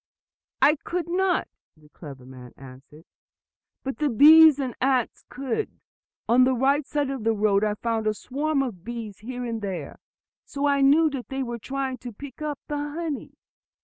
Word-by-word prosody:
"I 300 +1 +5
could 345 +3 -4
not," 365 +1 +1 0.3
the 150 -1 -21
clever 140 -5 -11
man 125 -1 -12
answered, 135 +4 -14 0.8
"but 270 -3 -5
the 300 -1 +1
bees 305 +4 +8
and 260 -4 -3
the - - -6
ants 260 -3 0
could! 270 - -4 0.5
On 245 +2 +5
the 260 0 +3
right 275 +3 +1
side 290 -2 -1
of 265 -5 -5
the 225 0 +2
road 205 -1 +2
I 210 -1 0
found 225 0 -2
a 215 - +1
swarm 280 +5 -1
of 205 -10 -6
bees 225 -3 -7
here 245 +3 -6
and 230 -2 -4
there; 195 -3 -5 0.4
so 280 0 -4
I 280 -1 +2
knew 300 +3 +5
that 265 -3 -6
they 270 0 -2
were 240 -1 -5
trying 265 +1 -4
to 245 - -8
pick 270 +6 -11
up 300 -2 -3
the 295 - -3
honey. 295 0 -5
260 Hz, 180 wpm, -25 LUFS, 215-290 Hz, 0.8 s, bees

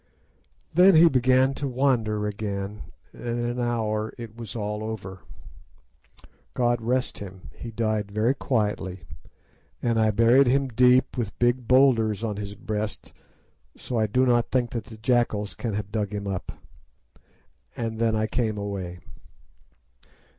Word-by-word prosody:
"Then 180 +3 +7
he 165 +2 +8
began 130 -1 +3
to 140 +1 -3
wander 120 -5 +1
again, 105 -1 -4 0.3
and 120 0 -4
in 120 - -1
an 120 +1 -2
hour 110 -3 -1
it 115 -2 -9
was 115 -3 -8
all 105 -1 -3
over. 95 -4 -6 1.4
"God 120 -1 +1
rest 125 +3 -1
him! 95 -2 -10
he 120 - -8
died 110 -2 -1
very 110 +5 +1
quietly, 105 -8 -2 0.8
and 115 -2 0
I 110 -1 +4
buried 115 +5 +5
him 135 +1 +2
deep, 125 +2 +3
with 110 -4 -3
big 120 0 +1
boulders 115 -5 +4
on 105 -3 -2
his 100 -1 -6
breast; 105 0 -5 0.6
so 120 -3 -3
I 110 - +2
do 125 +5 +2
not 120 -2 +2
think 125 -2 0
that 115 -3 -4
the 110 - -12
jackals 110 -3 0
can 110 -4 -4
have 105 -1 -4
dug 105 -2 -2
him 100 0 -4
up. 95 -2 -4 1.3
And 115 -1 -3
then 115 -1 +2
I 110 0 +1
came 110 -2 -1
away." 95 -3 -5
110 Hz, 145 wpm, -25 LUFS, 105-125 Hz, 1.4 s, he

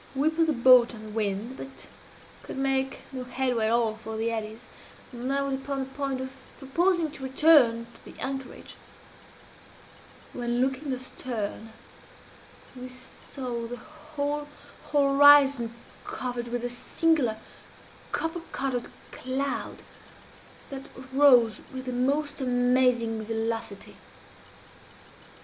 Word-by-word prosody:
We 290 +4 +2
put 325 0 +2
the 310 - +2
boat 245 -1 +6
on 215 - -10
the 215 - -9
wind, 215 +3 -2
but 270 0 -9 0.5
could - - -8
make 270 0 0
no 260 -2 -5
headway 250 -3 0
at - - +1
all 230 -2 +2
for 220 0 -7
the 225 +1 0
eddies, 220 0 -5 0.5
and 250 +1 -4
I 280 0 +1
was 275 -1 -2
upon 275 +1 -3
the - - -2
point 270 0 -3
of 260 +1 -6 0.2
proposing 335 +4 +1
to 300 - -9
return 265 -4 +5
to - - -18
the - - -12
anchorage, 265 -1 -6 1.6
when, 240 0 -2
looking 265 +2 0
astern, 235 -4 -5 1.0
we 255 0 -8
saw 250 -1 -7
the 245 +1 -6
whole 295 0 -5 0.4
horizon 280 -3 +6 0.3
covered 245 -1 -4
with 240 0 -3
a 245 - -1
singular 255 -2 +1 0.7
copper 325 +1 -2
colored 260 -3 -2 0.2
cloud 270 +2 -3 0.9
that 270 0 -7 0.3
rose 250 -6 +6
with 260 0 -7
the 255 - -3
most 280 +4 0
amazing 245 -3 +2
velocity. 225 -2 -4
255 Hz, 125 wpm, -27 LUFS, 235-275 Hz, 1.6 s, boat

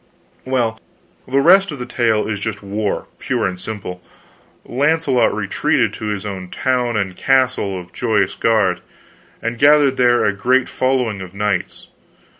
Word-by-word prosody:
"Well, 120 -4 -1 0.5
the 135 +2 +2
rest 190 +6 +5
of 150 - -5
the 125 - -5
tale 115 -3 0
is 105 -2 -3
just 105 -1 -4
war, 100 +1 -2
pure - - -1
and 90 -1 -3
simple. 95 -4 -7 0.6
Launcelot 140 0 +2
retreated - - 0
to - - -7
his 105 -2 -3
town 110 +5 -2
and 95 -3 -2
castle 130 -8 +1
of 90 -1 -13
Joyous 110 0 0
Gard, 110 -4 +1 0.6
and 115 0 -3
gathered 145 -2 +5
there 120 -1 +3
a 105 - +2
great 125 +6 +2
following 125 -6 -1
of 95 0 -9
knights. 100 -3 -2
115 Hz, 145 wpm, -19 LUFS, 100-130 Hz, 0.6 s, rest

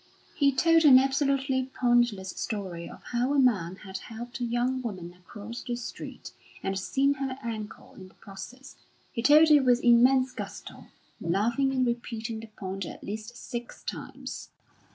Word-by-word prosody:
He 280 -2 +3
told 330 +5 +4
an 275 -4 +9
absolutely 270 -1 +1
pointless 240 -6 +2
story 190 -7 -5
of - - -13
how 250 +4 +1
a - - +4
man 195 -9 +2
had 190 -1 -6
helped 240 +4 -8
a - - -2
young 240 +2 0
woman 185 -7 -6
across 205 +6 -9
the 245 -2 -3
street, 240 - -8 0.3
and 195 0 -1
seen 275 +8 +2
her 265 -1 -4
ankle 220 -2 -6
in 185 - -12
the - - -22
process. 255 +7 -11 0.3
He 230 - -3
told 305 +5 +7
it 295 -1 +7
with 250 -1 +3
immense 255 +2 +5
gusto, - - -8 0.3
laughing 230 +10 +1
and 260 -1 +1
repeating 230 -1 -3
the 225 - -9
point 195 -2 -6
at - - -8
least 215 +3 -6
six 240 -1 -7
times. - - -7
240 Hz, 160 wpm, -28 LUFS, 210-265 Hz, 0.3 s, an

